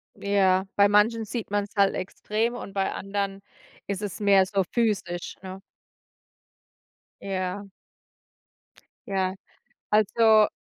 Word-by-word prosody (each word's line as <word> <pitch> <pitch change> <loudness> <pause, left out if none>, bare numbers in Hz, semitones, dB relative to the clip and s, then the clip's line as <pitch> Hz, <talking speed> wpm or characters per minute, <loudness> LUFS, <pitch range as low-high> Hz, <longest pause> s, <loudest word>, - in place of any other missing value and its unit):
Ja, 190 -1 +2
bei 200 0 +5
manchen 220 +2 +3
sieht 220 -1 -5
man's 205 0 -1
halt 200 -1 +3
extrem 215 +5 -2
und 200 -5 -8
bei 195 -1 0
anderen 195 0 -3 0.5
ist 200 0 -3
es 205 -1 -5
mehr 200 -2 +5
so 195 0 0
physisch, 200 -7 -1
ne? 190 0 -8 1.6
Ja. 195 +1 -4 1.4
Ja. 190 -1 -1 0.5
Also 215 0 +4
200 Hz, 105 wpm, -26 LUFS, 190-210 Hz, 1.6 s, bei